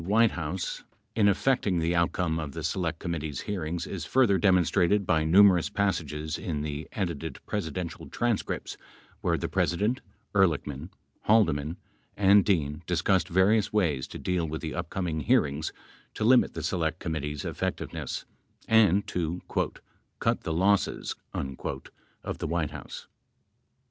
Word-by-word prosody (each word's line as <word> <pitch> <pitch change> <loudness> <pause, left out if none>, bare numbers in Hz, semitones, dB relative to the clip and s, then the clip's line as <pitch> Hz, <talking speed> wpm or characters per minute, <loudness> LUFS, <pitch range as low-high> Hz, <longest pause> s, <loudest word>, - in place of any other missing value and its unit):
78 90 +4 -5
White 115 -2 +6
House 85 +2 -4 0.3
in 105 -2 +4
effecting 100 -2 +2
the 85 +1 +1
outcome 85 -1 +1
of 75 -3 -5
the 80 - -5
Select 80 -1 -1
Committee's 80 -6 -4
hear 100 -5 -3
ings 85 +2 -3
is 95 -6 -5
further 105 -1 +3
demonstrated 95 +1 +3
by 80 -2 +2
numerous 90 +2 +6
passages 80 -7 -1
in 75 -4 -3
the 75 0 -4
edited 80 -7 -3
presi 105 -6 -2
dential 85 +2 -6
transcripts 120 -3 -2 0.4
where - - +1
the - - -2
President, 105 +9 0 0.3
Ehrlichman, 80 -5 +1 0.4
Haldeman 85 -7 +3 0.4
and 100 0 +6
Dean 75 -6 0
discussed 90 0 +2
various 100 +4 +3
ways 80 -11 +1
to - - -8
deal 90 -3 -1
with 80 +1 -4
the 80 -2 -4
upcoming 85 -1 -3
hearings 70 +1 +1 0.4
to - - -2
limit 125 +3 +4
the 80 - -4
Select 80 -1 -1
Committee's 75 -4 -4
effectiveness, - - -4 0.4
and 105 -3 +5
to 90 0 -3 0.8
"cut - - +1
the - - -3
losses" 95 +5 +1 0.2
of 65 0 -6
the - - -2
White 80 -2 -1
House. - - -8
See - - -32
e. - - -48
85 Hz, 145 wpm, -28 LUFS, 80-100 Hz, 0.8 s, White